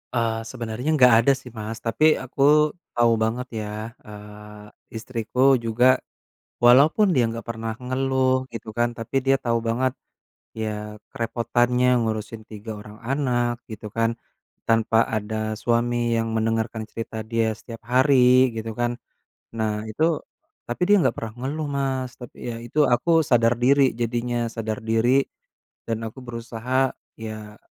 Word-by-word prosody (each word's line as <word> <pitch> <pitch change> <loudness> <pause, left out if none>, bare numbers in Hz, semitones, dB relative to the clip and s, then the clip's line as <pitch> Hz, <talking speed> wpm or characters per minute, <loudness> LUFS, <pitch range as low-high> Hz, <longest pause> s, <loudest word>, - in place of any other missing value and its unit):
Eee, 115 -1 0
sebenernya 120 +2 -5
nggak 125 -4 +6
ada 140 - +5
sih, 130 -2 -12
Mas, 110 0 -7
tapi 150 +8 +3
aku 145 +4 +3 0.2
tau 120 -1 +4
banget 120 +3 -2
ya, 105 +1 -5 0.2
eee, 105 0 -11 0.3
istriku 115 +1 -5 0.2
juga, 125 +3 +3 0.6
walaupun 150 - +5
dia 120 -4 +2
nggak 115 0 -7
pernah 115 -1 -4
ngeluh 130 0 +1
gitu 115 -1 -8
kan 120 0 +1
tapi 115 +4 -5
dia 135 0 +5
tau 115 -2 0
banget, 130 +2 +1 0.6
ya 105 -1 -5
kerepotannya 120 +2 +1
ngurusin 110 0 -3
3 110 +1 -8
orang 105 +1 -13
anak 125 -2 0 0.2
gitu 105 0 -7
kan, 115 +2 0 0.6
tanpa 115 0 +3 0.2
ada 110 0 -3 0.3
suami 120 0 +1
yang 115 0 -1
mendengarkan 110 0 -1
cerita 115 -1 -6
dia 115 -1 +2
setiap 115 -1 -10
hari 130 -1 +5
gitu 115 0 -4
kan. 120 0 +1 0.6
Nah 110 -1 -2
itu, 110 +8 -2 0.6
tapi 120 +8 -5
dia 205 - +6
nggak 130 -5 +1
pernah 110 -1 -5
ngeluh, 150 +1 -3
Mas, 130 -2 -1
tapi 125 - -11
ya 115 - -6
itu, 135 +6 -2
aku 145 - 0 0.2
sadar 115 -1 +4
diri 140 +2 +5 0.2
jadinya, 120 +1 -1 0.2
sadar 110 -1 -3
diri, 120 +5 +3 0.7
dan 115 0 -2
aku 110 +4 -8
berusaha, 120 +2 -2 0.2
ya 110 -1 -8
115 Hz, 140 wpm, -24 LUFS, 110-130 Hz, 0.7 s, nggak